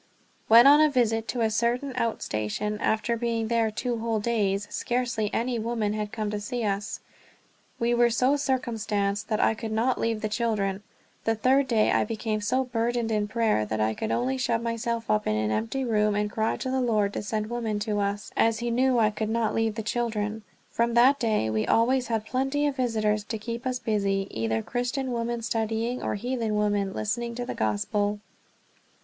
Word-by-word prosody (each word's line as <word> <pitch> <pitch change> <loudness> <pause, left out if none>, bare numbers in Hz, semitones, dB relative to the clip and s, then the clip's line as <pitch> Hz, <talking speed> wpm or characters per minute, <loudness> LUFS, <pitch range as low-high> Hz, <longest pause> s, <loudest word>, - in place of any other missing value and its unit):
When 230 +2 +8
on 290 +2 +8
a 310 - +5
visit 225 -4 +1
to 245 - -2
a 220 -1 +2
certain 240 +5 0
out 230 -3 -1
station, 110 - -2
after 220 +2 +1
being 230 -1 -1
there 230 -1 +2
two 235 +2 -3
whole 225 -1 -1
days, 205 -3 0
scarcely 240 -3 -1
any 240 0 -1
women 220 -2 -1
had 210 -1 -3
come 215 -2 -3
to 210 - -2
see 235 +3 -3
us. 200 0 -2 0.8
We 235 +1 +1
were 240 0 +4
so 255 +4 +2
circumstanced 225 -7 -1
that 215 - 0
I - - +3
could 220 0 -6
not 230 +4 +1
leave 225 -1 0
the 215 - 0
children. 210 -3 -1 0.4
The 225 - +2
third 260 +5 +3
day 220 -3 +3
I - - +3
became 215 0 -2
so 255 +6 +1
burdened 235 -1 -1
in 210 -1 0
prayer 220 - +1
that 110 +1 -3
I 110 +1 +1
could 220 - -4
only 260 +2 0
shut 235 -2 0
myself 230 0 -2
up 215 0 +1
in 105 - +1
an 110 0 0
empty 115 - -1
room 210 -3 +2
and 210 0 -1
cry 220 +1 0
to 260 - -3
the 260 0 +1
Lord 210 -4 +1
to - - -3
send 215 +1 -3
women 230 -3 -2
to 210 -1 -1
us, 200 +1 -2
as 225 0 +3
he 240 +1 -2
knew 255 +1 +2
I 215 -2 +3
could 215 +1 -3
not 230 0 0
leave 225 -1 0
the 220 - -4
children. 220 -1 -2 0.3
From 235 0 0
that 260 +4 +5
day 215 - +1
we 110 0 0
always 245 +2 +3
had 220 -2 -1
plenty 270 +4 0
of 285 -2 0
visitors 215 -4 0
to 220 - -4
keep 235 +4 -5
us 255 -1 -1
busy, 200 -4 0
either 110 0 -1
Christian 250 +2 -2
women 235 0 -2
studying 225 +2 -1
or - - -2
heathen 230 0 -2
women 205 -2 +1
listening 235 +4 -3
to 245 0 -3
the - - -4
Gospel. 205 - -1
225 Hz, 200 wpm, -26 LUFS, 210-240 Hz, 0.8 s, When